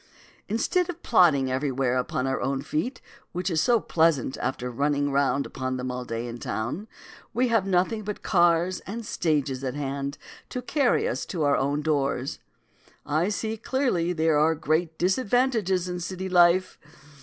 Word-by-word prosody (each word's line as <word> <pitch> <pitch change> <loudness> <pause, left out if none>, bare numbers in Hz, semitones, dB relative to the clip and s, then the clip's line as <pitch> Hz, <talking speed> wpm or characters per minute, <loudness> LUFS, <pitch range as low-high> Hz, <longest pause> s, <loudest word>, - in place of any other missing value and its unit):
Instead 340 - +1
of 350 -1 -7
plodding 145 - +4
everywhere 130 -1 0
upon 125 0 -1
our 135 0 -1
own 135 +1 -1
feet, 245 - -3 0.3
which 180 +1 -2
is 160 -2 +2
so 240 -2 +4
pleasant 160 - +1
after 125 -1 -2
running 145 +2 0
round 140 0 +1
upon 130 0 -3
them 125 0 -3
all 125 0 -5
day 115 0 -4
in 120 0 -7
town, 120 - -3 0.5
we 250 +1 +2
have 225 -4 +2
nothing 190 +4 +1
but 210 0 -5
cars 175 0 +3
and 225 +3 -5
stages 145 -8 -1
at 130 0 -3
hand 140 0 -3 0.3
to 250 - -4
carry 280 - +1
us - - -2
to 170 -5 -3
our 145 -1 +3
own 145 +2 0
doors. 140 -3 -1 0.7
I 155 +6 +1
see 220 +1 -2
clearly 220 -8 0
there 160 -3 +2
are 160 +2 +3
great 160 +1 0
disadvantages 200 -2 +1
in 180 0 -3
city 185 +2 -4
life. 180 +1 +4
165 Hz, 165 wpm, -26 LUFS, 140-195 Hz, 0.7 s, plodding